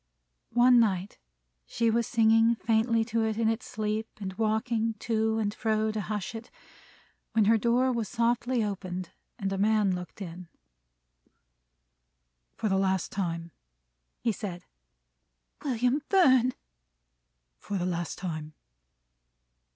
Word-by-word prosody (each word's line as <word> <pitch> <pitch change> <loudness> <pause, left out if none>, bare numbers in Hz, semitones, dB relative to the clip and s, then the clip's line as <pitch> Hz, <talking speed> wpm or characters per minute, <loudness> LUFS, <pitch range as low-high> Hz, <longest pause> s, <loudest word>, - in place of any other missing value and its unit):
One 245 0 +6
night 195 -4 0 0.5
she 230 -1 +1
was 235 0 +1
singing 225 0 +4
faintly 225 0 +1
to 225 0 0
it 220 -1 -1
in 225 -1 +2
its 225 +2 -2
sleep 215 +1 -2
and 190 -2 -5
walking 225 +1 0
to 220 0 0
and 210 -2 -1
fro 220 -1 0
to 215 -1 -3
hush 210 +1 -4
it, 225 +1 -8 0.8
when 220 -2 +4
her 225 +2 +5
door 245 +4 +2
was 230 -5 -2
softly 240 0 +1
opened, 185 -3 -4 0.3
and 195 -4 -2
a 195 - -2
man 210 -2 +3
looked 180 +2 -7
in. 180 -2 -7 2.1
"For 220 - -2
the 190 -1 +2
last 190 -2 0
time," 170 -3 -3 0.7
he 230 - +1
said. 195 -4 -6 1.0
"William 250 +1 +1
Fern!" 260 -10 +5 1.1
"For 200 - -4
the 180 - -1
last 175 -2 -3
time." 155 -4 -5
220 Hz, 130 wpm, -28 LUFS, 195-230 Hz, 2.1 s, One